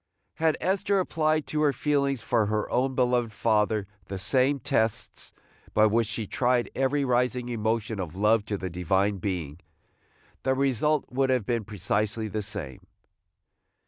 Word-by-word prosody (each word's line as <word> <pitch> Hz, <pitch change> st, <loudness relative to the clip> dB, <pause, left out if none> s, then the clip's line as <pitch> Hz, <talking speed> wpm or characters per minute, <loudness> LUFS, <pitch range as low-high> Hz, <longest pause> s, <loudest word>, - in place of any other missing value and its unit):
Had 160 Hz, -1 st, +2 dB
Esther 195 Hz, +1 st, +1 dB
applied 155 Hz, -4 st, +1 dB
to 150 Hz, -, -2 dB
her 150 Hz, -2 st, +4 dB
feelings 140 Hz, -4 st, 0 dB
for 115 Hz, -4 st, +2 dB
her 105 Hz, 0 st, -1 dB
own 130 Hz, +1 st, +1 dB
beloved 125 Hz, -2 st, +2 dB
father 105 Hz, -1 st, +1 dB, 0.2 s
the 95 Hz, 0 st, -5 dB
same 130 Hz, +8 st, +2 dB
tests 110 Hz, -2 st, -1 dB, 0.4 s
by 110 Hz, -, +6 dB
which 110 Hz, +1 st, +2 dB
she 110 Hz, 0 st, -3 dB
tried 125 Hz, +3 st, +1 dB
every 135 Hz, +2 st, +1 dB
rising 125 Hz, 0 st, +1 dB
emotion 110 Hz, -1 st, -1 dB
of 90 Hz, -3 st, -5 dB
love 105 Hz, +2 st, +3 dB
to 105 Hz, -, -2 dB
the 95 Hz, -2 st, -5 dB
Divine 95 Hz, +3 st, +1 dB
Being, 85 Hz, -6 st, -3 dB, 0.8 s
the 130 Hz, 0 st, +1 dB
result 140 Hz, +2 st, +1 dB
would 135 Hz, +1 st, +1 dB
have 125 Hz, -5 st, +1 dB
been 115 Hz, -2 st, -1 dB
precisely 105 Hz, +2 st, -1 dB
the 110 Hz, +1 st, -3 dB
same. 100 Hz, -, -6 dB
115 Hz, 150 wpm, -27 LUFS, 105-130 Hz, 0.8 s, by